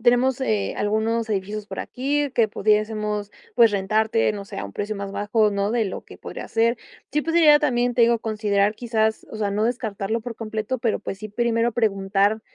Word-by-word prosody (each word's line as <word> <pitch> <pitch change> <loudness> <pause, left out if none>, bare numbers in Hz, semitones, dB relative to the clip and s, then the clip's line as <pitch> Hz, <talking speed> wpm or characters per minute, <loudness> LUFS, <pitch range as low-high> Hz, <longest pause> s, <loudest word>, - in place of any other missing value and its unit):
tenemos, 245 +2 +3
eh, 215 -6 0
algunos 220 +2 0
edificios 205 +1 -3
por - - -5
aquí 285 +3 -1
que 230 -4 +3
pudiésemos, 210 0 0 0.2
pues, 230 -2 +6
rentarte, 215 +3 +1
no 200 -1 -6
sé, - - -10
a - - -3
un 100 - -8
precio 205 - -3
más 200 -1 -5
bajo, 210 +2 +1
¿no?, 200 +1 -1
de 235 -2 +2
lo 190 - -5
que - - -13
podría - - -8
ser". 230 +1 +2 0.3
Sí, 300 +1 0
pues, 325 +2 -2
sería 305 -3 +7
también, 245 -4 +1
te 240 - +4
digo, 235 0 +4
considerar, 210 -2 0
quizás 220 -2 0
o - - -5
sea, 210 -2 -1
no 210 +2 0
descartarlo 225 -2 -2
por 230 0 -7
completo, 220 +3 -3
pero, 230 -2 0
pues, 195 - -6
sí, 215 +1 -7
primero 235 +2 +1
preguntar 200 -1 +1
220 Hz, 200 wpm, -23 LUFS, 205-235 Hz, 0.3 s, sería